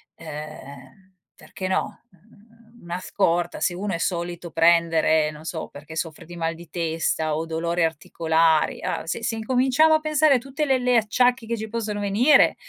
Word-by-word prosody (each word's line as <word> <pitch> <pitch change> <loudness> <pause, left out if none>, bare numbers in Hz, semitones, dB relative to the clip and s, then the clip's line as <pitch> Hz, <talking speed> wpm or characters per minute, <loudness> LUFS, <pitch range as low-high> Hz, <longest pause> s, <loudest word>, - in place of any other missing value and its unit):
uhm, 155 +4 -10 0.2
perché 185 - -7
no, 185 - -2
uhm, 225 +4 -23
una 175 +1 -5
scorta. 175 -2 0
Se 180 - 0
uno 195 +2 -3
è - - -1
solito 175 0 -3
prendere 165 -2 +3
non 150 +1 -12
so 160 0 -5
perché 150 +2 -11
soffre 160 -1 -5
di 175 +2 -11
mal 165 -1 -2
di 170 +1 -13
testa 160 -2 -1
o 160 +2 -2
dolore 170 +1 -1
articolari, 160 0 +1
ah - - -3
se 165 - -4
se 230 0 -1
incominciamo 260 +7 +3
a 315 - +4
pensare 310 -2 +3
a - - +4
tutte 275 +4 -3
le 265 -2 +2
le 250 -1 +3
acciacchi 235 +2 +2
che 235 - -1
ci 220 0 -6
possono 215 -2 -3
venire, 220 +9 +4
180 Hz, 175 wpm, -23 LUFS, 165-230 Hz, 0.2 s, a